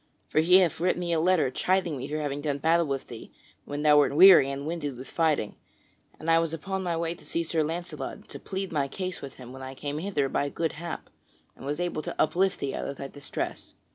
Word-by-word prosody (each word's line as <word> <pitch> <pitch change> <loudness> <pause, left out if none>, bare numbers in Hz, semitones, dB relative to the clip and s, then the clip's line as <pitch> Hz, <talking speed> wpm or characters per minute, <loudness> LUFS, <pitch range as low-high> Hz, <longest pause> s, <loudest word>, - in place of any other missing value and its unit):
For - - +2
he 170 +3 +5
hath 180 -5 +2
writ 180 +1 +1
me 175 -1 -1
a 165 - +2
letter 170 -5 +3
chiding 185 -2 +1
me 135 0 -5
for 150 +1 -3
having 145 -2 -3
done 145 -2 -1
battle 165 +3 +2
with 135 -1 -2
thee 115 - -10 0.3
when 145 +1 -4
thou 150 -1 +7
wert 145 -1 +2
weary 175 -5 +9
and 140 +1 -4
winded 150 -5 -3
with 130 - -9
fighting. 155 -10 0 0.6
And 155 - -8
I 165 0 +5
was 165 -1 -1
upon 190 +4 -4
my 175 -3 -1
way 165 0 -1
to - - -16
see 170 - -2
Sir 160 0 0
Launcelot 155 -3 -4
and - - -15
to - - -8
plead 190 0 -4
my 145 -4 0
cause 185 +5 -4
with 135 -1 -8
him 125 -1 -11
when 130 - -9
I 130 0 -7
came 145 +2 -4
hither 160 -6 0
by 140 +1 -1
good 165 +2 -1
hap, 170 +2 -7 0.4
and 135 - -9
was 145 +3 -2
able 175 -3 -1
to - - -6
uplift 180 +5 +2
thee 135 - -2
out - - -3
of 140 - -4
thy 135 - -6
distress." 145 0 -5
155 Hz, 245 wpm, -27 LUFS, 140-170 Hz, 0.6 s, weary